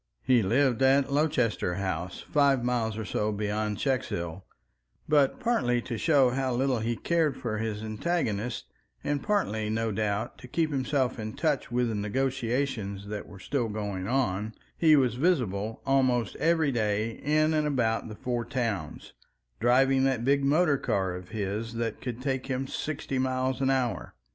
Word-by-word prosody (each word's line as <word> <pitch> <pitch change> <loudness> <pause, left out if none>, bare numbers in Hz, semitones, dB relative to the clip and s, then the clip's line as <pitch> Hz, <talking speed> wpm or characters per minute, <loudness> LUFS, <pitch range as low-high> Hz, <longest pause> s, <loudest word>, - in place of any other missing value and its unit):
He 125 -2 +4
lived 125 +5 +2
at 135 +1 +4
Lowchester 135 - +1
House, 95 -2 -3
five 140 -4 +3
miles 115 -3 0
or 110 - -4
so 105 +1 -1
beyond 105 0 -2
Checkshill; 100 - -2 0.7
but 145 -3 +3
partly 180 - +1
to 120 - -4
show 135 -1 +4
how 130 -1 -1
little 130 -1 +1
he 115 +2 -1
cared 160 -1 +1
for 110 -3 -3
his 110 -1 -3
antagonists, 110 - -2 0.4
and 145 -1 -1
partly 110 - 0
no 110 +1 0
doubt 105 0 -2
to 130 - -11
keep 160 +4 0
himself 130 -2 0
in 110 0 -4
touch 150 -7 -1
with 125 0 +1
the - - -2
negotiations 115 -2 -2
that 105 -1 -5
were 100 - -12
still 120 +4 -2
going 100 -3 -3
on, 110 -4 0 0.2
he 160 -2 +5
was 130 -5 +3
visible 115 - 0
almost 130 -4 +2
every 160 -3 +2
day 110 -2 0
in 155 +6 +1
and 155 -1 +1
about 115 -6 0
the 110 - -7
Four 120 +1 -2
Towns, 115 - -3 0.5
driving 130 +3 +4
that 130 -3 0
big 140 +1 +3
motor 145 0 +3
car 95 -2 0
of 90 0 -8
his 110 +2 -3
that 115 -2 -3
could 125 -1 -5
take 130 -2 -1
him 130 0 -1
sixty 135 -1 -3
miles 130 0 0
an 135 - +2
hour. 125 - -1
125 Hz, 165 wpm, -28 LUFS, 110-135 Hz, 0.7 s, he